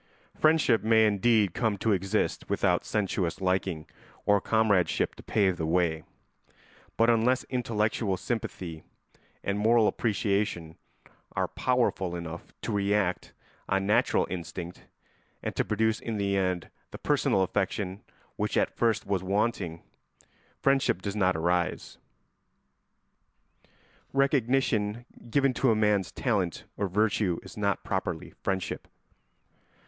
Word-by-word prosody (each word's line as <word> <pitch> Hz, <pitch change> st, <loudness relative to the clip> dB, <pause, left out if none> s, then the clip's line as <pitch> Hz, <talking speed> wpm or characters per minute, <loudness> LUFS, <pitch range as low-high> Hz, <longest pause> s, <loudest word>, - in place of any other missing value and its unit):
] -, -, -30 dB
Friendship 155 Hz, -7 st, +4 dB
may 110 Hz, 0 st, +4 dB
indeed 105 Hz, -2 st, +3 dB
come 110 Hz, -4 st, 0 dB
to 110 Hz, -, 0 dB
exist 95 Hz, -1 st, 0 dB
without -, -, +2 dB
sensuous 95 Hz, -5 st, -1 dB
liking 95 Hz, -4 st, -1 dB, 0.4 s
or 105 Hz, -1 st, +4 dB
comradeship 105 Hz, -5 st, +2 dB
to -, -, -13 dB
pave 95 Hz, -4 st, +1 dB
the 80 Hz, -, -2 dB
way; 80 Hz, -2 st, +1 dB, 1.0 s
but 115 Hz, -, +4 dB
unless 120 Hz, +3 st, +3 dB
intellectual 110 Hz, -5 st, 0 dB
sympathy 90 Hz, -7 st, -4 dB, 0.6 s
and 100 Hz, +1 st, -1 dB
moral 110 Hz, +1 st, +4 dB
appreciation 100 Hz, -7 st, -1 dB, 0.6 s
are -, -, 0 dB
powerful 120 Hz, -8 st, 0 dB
enough 85 Hz, -1 st, -7 dB
to -, -, -2 dB
react 100 Hz, -2 st, 0 dB, 0.4 s
on 95 Hz, 0 st, +1 dB
natural 105 Hz, -, +3 dB
instinct 90 Hz, 0 st, -6 dB, 0.6 s
and -, -, -3 dB
to -, -, +1 dB
produce 110 Hz, +1 st, 0 dB
in 115 Hz, -2 st, -4 dB
the 100 Hz, -1 st, 0 dB
end 90 Hz, -3 st, -1 dB, 0.2 s
the -, -, -8 dB
personal 95 Hz, -, +2 dB
affection 95 Hz, +1 st, -2 dB, 0.4 s
which -, -, -1 dB
at -, -, +1 dB
first 115 Hz, -2 st, +1 dB
was 95 Hz, -2 st, 0 dB
wanting, 95 Hz, -3 st, -1 dB, 0.8 s
friendship 135 Hz, -9 st, +2 dB
does 100 Hz, 0 st, -3 dB
not 95 Hz, -3 st, +2 dB
arise. 85 Hz, +2 st, -1 dB, 2.1 s
Recognition 125 Hz, -5 st, +1 dB, 0.2 s
given 135 Hz, +2 st, +2 dB
to 130 Hz, +2 st, +2 dB
a 110 Hz, -, +4 dB
man's 105 Hz, -3 st, +2 dB
talent 100 Hz, -, -1 dB
or 100 Hz, -, -1 dB
virtue 100 Hz, -2 st, +1 dB
is -, -, -11 dB
not 100 Hz, -2 st, -1 dB
properly 90 Hz, -4 st, -3 dB
friendship. 95 Hz, -2 st, -3 dB
100 Hz, 125 wpm, -28 LUFS, 90-110 Hz, 2.1 s, Friendship